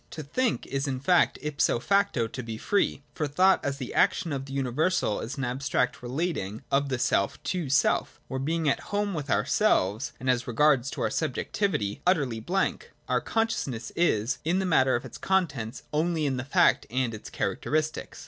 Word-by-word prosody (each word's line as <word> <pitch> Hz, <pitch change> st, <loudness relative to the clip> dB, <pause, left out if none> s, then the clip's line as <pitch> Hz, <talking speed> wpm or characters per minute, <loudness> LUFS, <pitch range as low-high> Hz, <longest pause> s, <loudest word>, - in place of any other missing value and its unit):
To 155 Hz, -, -7 dB
tliink 235 Hz, -, -1 dB
is 135 Hz, +1 st, -2 dB
in 130 Hz, -2 st, -2 dB
fact 175 Hz, +6 st, +3 dB
ipso 150 Hz, -4 st, +1 dB
facto 195 Hz, -, +2 dB
to 125 Hz, +3 st, -6 dB
be 115 Hz, -2 st, -6 dB
free, 200 Hz, -, 0 dB
for 150 Hz, -, -2 dB
thought 185 Hz, +7 st, +3 dB
as 140 Hz, -1 st, -2 dB
the 130 Hz, -3 st, -6 dB
action 165 Hz, -, +2 dB
of 135 Hz, -1 st, -3 dB
the 135 Hz, -, -8 dB
universal 135 Hz, -, 0 dB
is 120 Hz, +4 st, -5 dB
an 135 Hz, -, -2 dB
abstract 125 Hz, 0 st, -1 dB
relating 125 Hz, -, -3 dB
of 140 Hz, +1 st, +2 dB
self 100 Hz, -4 st, +1 dB
to 165 Hz, 0 st, -2 dB
self, 140 Hz, +1 st, +2 dB
where, 130 Hz, -, -3 dB
being 160 Hz, +3 st, -1 dB
at 140 Hz, -, +2 dB
home 205 Hz, 0 st, 0 dB
with 145 Hz, -4 st, -4 dB
ourselves, 105 Hz, +3 st, +2 dB
and 130 Hz, -, -6 dB
as 125 Hz, -1 st, +1 dB
regards 135 Hz, +1 st, +3 dB
our -, -, 0 dB
subjectivity, 155 Hz, -, -1 dB
utterly 140 Hz, -11 st, +2 dB
blank, 185 Hz, -, -2 dB
our -, -, +1 dB
con 225 Hz, 0 st, +1 dB
sciousness 125 Hz, -, -4 dB
is, 120 Hz, -8 st, +1 dB
in 170 Hz, +4 st, +1 dB
the 190 Hz, -, 0 dB
matter 130 Hz, -7 st, +3 dB
of 120 Hz, -, -3 dB
its -, -, -9 dB
contents, 145 Hz, -12 st, -1 dB
only 160 Hz, 0 st, +1 dB
in 135 Hz, -2 st, 0 dB
the 125 Hz, -, -4 dB
fact 140 Hz, -, +3 dB
and 125 Hz, -1 st, -1 dB
its 105 Hz, -, -8 dB
characteristics. 155 Hz, +10 st, -2 dB
140 Hz, 185 wpm, -27 LUFS, 125-165 Hz, -, fact